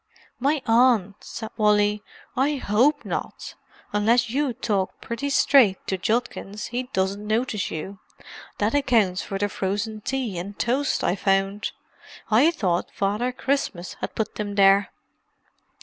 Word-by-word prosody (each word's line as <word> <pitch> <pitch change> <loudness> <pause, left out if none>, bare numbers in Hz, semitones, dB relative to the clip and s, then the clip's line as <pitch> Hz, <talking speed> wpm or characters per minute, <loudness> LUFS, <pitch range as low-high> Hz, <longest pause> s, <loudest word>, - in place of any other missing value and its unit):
"My 280 +2 +1
Aunt!" 225 -4 +3
said 220 -2 -7
Wally. 210 -1 +3 0.3
"I 280 +4 +2
hope 275 +5 +2
not—unless 225 +3 -2
you 280 +1 0
talk 200 -4 -2
pretty 260 +5 -4
straight 260 -8 +5
to 190 - -1
Judkins 215 0 -2
he 250 +1 -3
doesn't 195 +2 -1
notice 220 -1 0
you. 190 +5 -6 0.6
That 210 +2 0
accounts 230 -10 +2
for 195 - -4
the 205 +1 0
frozen 205 +2 -3
tea 240 -7 -2
and 200 +3 -7
toast 270 +5 0
I 180 - +1
found; 195 +1 0 0.6
I 245 +9 +6
thought 185 - -1
Father 210 +6 -1
Christmas 250 -9 -2
had - - -4
put 220 -1 -3
'em 205 -1 -3
there." 195 0 +5
210 Hz, 135 wpm, -24 LUFS, 195-250 Hz, 0.6 s, I